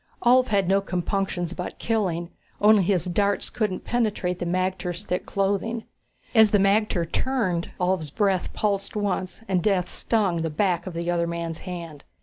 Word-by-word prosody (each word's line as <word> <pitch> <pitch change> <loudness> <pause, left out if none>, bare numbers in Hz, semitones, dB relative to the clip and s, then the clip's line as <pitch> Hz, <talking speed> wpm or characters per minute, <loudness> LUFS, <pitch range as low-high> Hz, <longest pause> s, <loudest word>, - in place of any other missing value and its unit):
Ulv 250 +1 +5
had 200 -4 +1
no 195 +1 +3
compunctions 180 -1 -2
about 180 0 -5
killing, 185 -7 -1 0.3
only 210 0 +6
his 180 -2 +1
darts 200 +3 0
couldn't 210 -6 -2
penetrate 210 -7 -1
the 175 - -2
magter's 185 0 -1
thick 180 -3 -3
clothing. 200 +4 -1 0.5
As 220 -3 +7
the 205 - +4
magter 195 -2 +2
turned, 185 -5 -1
Ulv's 180 -4 0
breath 195 +2 0
pulsed 200 -1 -1
once 200 0 -2
and 185 -2 +1
death 185 -2 +1
stung 195 -7 0
the 165 - -1
back 175 +2 0
of 180 - -6
the 170 +1 -1
other 170 -1 +1
man's 170 -1 -4
hand. 165 -5 -7
190 Hz, 160 wpm, -25 LUFS, 175-205 Hz, 0.5 s, As